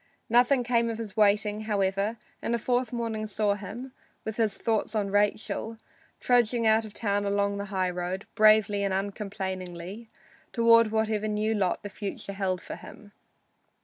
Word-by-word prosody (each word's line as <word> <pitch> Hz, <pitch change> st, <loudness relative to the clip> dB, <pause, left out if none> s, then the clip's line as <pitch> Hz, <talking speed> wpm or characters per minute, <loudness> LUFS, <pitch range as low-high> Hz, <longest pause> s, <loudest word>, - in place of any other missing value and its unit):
Nothing 245 Hz, +2 st, +4 dB
came 235 Hz, -1 st, +1 dB
of 225 Hz, -, -3 dB
his 220 Hz, -4 st, -7 dB
waiting, 210 Hz, 0 st, +3 dB
however, 200 Hz, +1 st, 0 dB, 0.2 s
and 235 Hz, -, 0 dB
the -, -, +1 dB
fourth 245 Hz, +1 st, 0 dB
morning 225 Hz, -3 st, -3 dB
saw 210 Hz, -1 st, +1 dB
him, 210 Hz, +6 st, -7 dB, 0.3 s
with 220 Hz, -1 st, -4 dB
his 215 Hz, -4 st, +1 dB
thoughts 225 Hz, -1 st, -1 dB
on 200 Hz, -2 st, 0 dB
Rachel, 210 Hz, +2 st, 0 dB, 0.4 s
trudging 240 Hz, -1 st, +2 dB
out 220 Hz, +1 st, +4 dB
of 215 Hz, -, -9 dB
town 205 Hz, -2 st, 0 dB
along 200 Hz, 0 st, 0 dB
the 200 Hz, -, -3 dB
highroad, 185 Hz, -1 st, -2 dB
bravely 215 Hz, -1 st, +5 dB
and 195 Hz, -1 st, 0 dB
uncomplainingly, 195 Hz, 0 st, -5 dB, 0.4 s
toward 230 Hz, -1 st, +5 dB
whatever 220 Hz, -1 st, 0 dB
new 215 Hz, +1 st, 0 dB
lot 195 Hz, -4 st, 0 dB
the 205 Hz, -, -5 dB
future 200 Hz, 0 st, -6 dB
held 190 Hz, -2 st, -1 dB
for -, -, -7 dB
him. 205 Hz, -2 st, -13 dB
210 Hz, 155 wpm, -27 LUFS, 200-225 Hz, 0.4 s, bravely